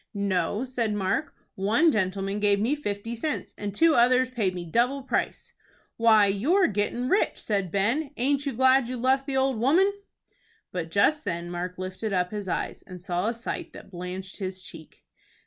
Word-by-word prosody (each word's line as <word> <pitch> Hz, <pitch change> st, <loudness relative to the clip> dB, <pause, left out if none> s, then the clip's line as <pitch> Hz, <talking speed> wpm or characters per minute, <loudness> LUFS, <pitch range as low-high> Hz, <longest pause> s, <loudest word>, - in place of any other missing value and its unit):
"No," 200 Hz, +2 st, 0 dB
said 235 Hz, -5 st, -2 dB
Mark; 200 Hz, +10 st, -1 dB, 0.2 s
"one 225 Hz, -, +3 dB
gentleman 195 Hz, -2 st, -1 dB
gave 205 Hz, -1 st, +3 dB
me 230 Hz, +7 st, +1 dB
fifty 230 Hz, -5 st, -4 dB
cents, 300 Hz, +6 st, -3 dB
and 205 Hz, -1 st, -4 dB
two 330 Hz, +4 st, +5 dB
others 255 Hz, 0 st, +4 dB
paid 205 Hz, -7 st, -1 dB
me 175 Hz, -1 st, -5 dB
double 245 Hz, -, +1 dB
price." -, -, -2 dB, 0.4 s
"Why, 220 Hz, -2 st, +5 dB
you're 270 Hz, -, +2 dB
gettin' 210 Hz, -, -1 dB
rich!" 390 Hz, +9 st, +2 dB
said 195 Hz, -5 st, -1 dB
Ben. 230 Hz, -, 0 dB
"Aint 280 Hz, +3 st, 0 dB
you 275 Hz, -, -1 dB
glad 260 Hz, +1 st, +4 dB
you've 250 Hz, 0 st, -4 dB
left 265 Hz, +3 st, +1 dB
the 270 Hz, -1 st, -1 dB
old 265 Hz, -3 st, +1 dB
woman?" 350 Hz, -, +3 dB, 0.8 s
But 170 Hz, -3 st, -4 dB
just 290 Hz, -, +2 dB
then 170 Hz, +1 st, -4 dB
Mark 180 Hz, +1 st, -4 dB
lifted 185 Hz, +3 st, -4 dB
up 180 Hz, -1 st, 0 dB
his 205 Hz, -2 st, -5 dB
eyes, -, -, -3 dB
and 180 Hz, -1 st, -9 dB
saw 180 Hz, +1 st, -2 dB
a 230 Hz, -, 0 dB
sight 235 Hz, +2 st, -5 dB
that -, -, -12 dB
blanched 185 Hz, +1 st, -6 dB
his 185 Hz, -1 st, -5 dB
cheek. 160 Hz, -, -12 dB
215 Hz, 180 wpm, -26 LUFS, 190-260 Hz, 0.8 s, two